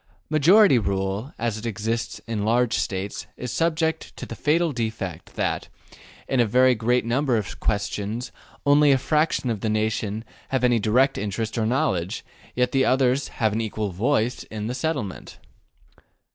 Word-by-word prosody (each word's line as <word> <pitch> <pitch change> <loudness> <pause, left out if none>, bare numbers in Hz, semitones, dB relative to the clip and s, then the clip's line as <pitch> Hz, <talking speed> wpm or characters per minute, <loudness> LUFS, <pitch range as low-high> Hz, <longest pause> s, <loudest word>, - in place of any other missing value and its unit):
Majority 155 - +6
rule, 100 +4 -2
as 115 -2 -2
it 110 - -8
exists 115 +2 -2
in 110 -2 -2
large 120 +2 +2
States, 95 +1 -3
is 125 - -5
subject 160 -1 -1
to - - -6
the - - -7
fatal 160 +2 +2
defect 110 - -4
that, - - -2 0.6
in 135 - 0
a 120 - +5
very 125 +4 +5
great 120 +2 +1
number 125 +1 +1
of 105 - -5
questions, 105 +3 -2 0.3
only 145 0 +5
a 135 - +5
fraction 150 -2 +1
of 110 - -3
the 110 - -1
nation 110 0 -1 0.2
have 130 -2 0
any 120 -2 +4
direct 125 +6 +2
interest 105 +2 -3
or 110 -2 0
knowledge, 95 -8 -1 0.3
yet 125 0 +1
the 135 -1 +3
others 130 +1 +2
have 110 -3 -1
an 110 - 0
equal 110 -2 -3
voice 115 +5 0
in 105 -1 -6
their 120 - -2
settlement. 130 - -4
115 Hz, 160 wpm, -24 LUFS, 105-130 Hz, 0.6 s, Majority